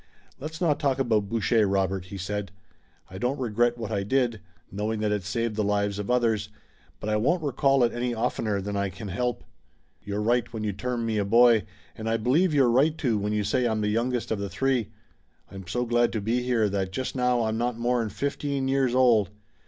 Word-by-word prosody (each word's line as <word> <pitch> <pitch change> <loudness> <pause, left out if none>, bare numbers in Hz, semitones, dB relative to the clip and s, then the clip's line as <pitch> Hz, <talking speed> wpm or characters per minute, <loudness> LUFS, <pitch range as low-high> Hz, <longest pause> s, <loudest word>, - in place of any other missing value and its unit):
"Let's 155 +4 -6
not 150 -5 +1
talk 135 -2 +1
about 110 -6 +1
Boucher, 110 -1 +2
Robert," 95 -1 0
he 100 +1 -8
said. 100 +1 -4 0.6
"I 95 - -7
don't 125 +6 -1
regret 120 0 +1
what 115 -2 -5
I 100 -2 0
did, 120 +1 0 0.3
knowing 105 +2 -2
that 105 -1 0
it 105 -1 0
saved 115 +3 -2
the 105 - 0
lives 100 0 0
of 105 - -4
others, 115 -4 +1 0.5
but - - -6
I 105 0 +1
won't 160 +10 +1
recall 135 -1 +2
it 120 - +2
any 120 +1 -1
oftener 110 -2 -1
than 100 +1 -4
I 100 0 0
can 100 +3 -8
help. 120 +5 -2 0.6
You're 100 0 -3
right 120 +2 +1
when 110 -2 -5
you 105 -1 -1
term 120 +3 -3
me 110 -2 0
a - - +1
boy, 115 +1 +5 0.3
and 110 0 -4
I 115 - +2
believe 140 +11 +2
you're 135 -5 +4
right, 150 +6 +3
too, 115 -8 0
when 105 +1 -2
you 105 0 0
say 120 +5 +1
I'm 110 -2 0
the 105 - 0
youngest 120 +2 -1
of 110 - 0
the 100 0 -3
three. 130 -2 0 0.6
I'm 95 -2 -9
so 125 +6 -1
glad 120 0 +2
to 110 - -1
be 115 +4 0
here 120 -3 +1
that 95 -2 -2
just 130 +7 -4
now 125 -2 +2
I'm 110 0 -1
not 120 -1 -1
more'n 120 -1 0
fifteen 140 +3 -2
years 135 -2 +1
old. 120 -7 +4
115 Hz, 215 wpm, -26 LUFS, 105-125 Hz, 0.6 s, boy